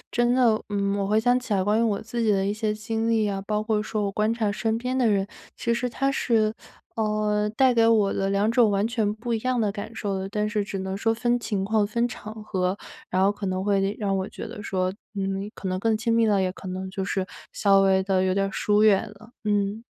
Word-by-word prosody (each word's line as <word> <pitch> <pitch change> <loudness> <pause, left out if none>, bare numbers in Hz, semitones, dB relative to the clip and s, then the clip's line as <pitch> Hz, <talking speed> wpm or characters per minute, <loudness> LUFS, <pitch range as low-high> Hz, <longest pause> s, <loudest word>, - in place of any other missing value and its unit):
真 240 0 +2
的， 240 -4 +3
嗯， 200 -1 0
我 200 -1 -1
回 215 +1 +3
想 245 +3 +3
起 245 - -5
来 195 - +2
关 210 +3 +2
于 - - +2
我 215 -3 +1
自 235 +2 -4
己 220 - +2
的 195 -1 +2
一 200 - 0
些 215 0 -1
经 225 +1 -2
历 220 -2 +2
啊， 195 -1 -3
包 210 -1 +1
括 215 -1 +1
说 215 0 -2
我 200 - -2
观 215 +2 +1
察 220 -3 0
身 225 +2 -1
边 250 +2 -2
的 245 -3 +3
人， 195 -2 +1 0.3
其 235 -1 0
实 240 +1 -1
它 275 +3 0
是， 220 -5 +1 0.4
呃， 210 -1 0
带 260 -2 +4
给 230 -1 +4
我 215 -3 +3
的 195 0 -1
2 200 +2 +2
种 230 -2 +4
完 200 +1 +1
全 225 -3 0
不 230 +2 -3
一 - - 0
样 255 0 0
的 210 -2 +1
感 205 +2 -7
受 205 -3 -3
的。 190 - -4
但 210 +1 -1
是 210 -1 0
只 200 -1 -5
能 190 0 -3
说 225 +3 +1
分 240 +1 +1
情 205 -4 -2
况、 215 +1 +2
分 235 +4 0
场 215 -2 -8
合， 185 -1 -1 0.3
然 185 - +1
后 195 +2 +4
可 205 -1 -6
能 185 0 -2
会 200 0 +1
让 195 -2 0
我 190 0 -2
觉 - - -7
得 210 - -8
说， 185 -2 -1 0.2
嗯， 195 +1 -2
可 - - -6
能 185 0 -1
更 220 +1 +1
亲 230 +1 0
密 230 0 +4
了， 205 -2 +3
也 185 -1 0
可 190 - -9
能 185 +1 -4
就 190 0 -3
是 190 -1 -2 0.3
稍 195 -2 +4
微 190 -1 +3
地 190 -1 +1
有 185 0 +1
点 195 +1 +1
疏 210 +1 +2
远 210 -1 +5
了， 220 +3 -16
嗯。 205 +1 0
210 Hz, 270 characters per minute, -25 LUFS, 195-225 Hz, 0.4 s, 远